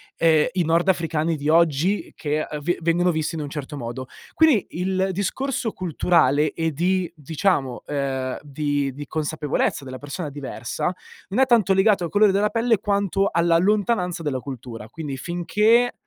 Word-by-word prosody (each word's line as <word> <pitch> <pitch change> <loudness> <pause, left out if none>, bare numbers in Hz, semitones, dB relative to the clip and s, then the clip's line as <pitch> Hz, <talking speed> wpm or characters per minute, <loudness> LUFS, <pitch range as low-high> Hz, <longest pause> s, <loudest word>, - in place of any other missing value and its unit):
ehm, 160 -2 +4
i 180 -1 +1
nordafricani 165 -1 +1
di 145 0 -3
oggi 165 +4 +2
che, 150 -2 -1
ehm, 150 -1 -4
ve 175 +4 0
vengono 175 +2 +2
visti 160 0 -2
in 160 - -3
un 145 - -5
certo 145 0 -6
modo. 130 0 -6 0.3
Quindi 310 - +4
il 190 +2 -1
discorso 225 +5 -2
culturale 155 -4 +2
e 165 -1 -1
di 180 +3 0
diciamo, 150 -3 -1
ehm, 135 -2 -2
di 145 -2 -2
di 145 +2 -7
consapevolezza 150 -2 -1
della 130 -1 -7
persona 145 +4 -5
diversa, 140 +3 -4 0.4
non 205 +7 +1
è - - +6
tanto 230 -7 +4
legato 190 -1 +3
al - - -4
colore 205 +3 +4
della 205 +2 +2
pelle, 230 -2 +1
quanto 200 -1 +1
alla 170 0 +3
lontananza 190 -2 +1
della 140 -4 -1
cultura. 120 -4 -8
Quindi 145 0 -6
finché 210 - +2
165 Hz, 160 wpm, -23 LUFS, 145-190 Hz, 0.4 s, è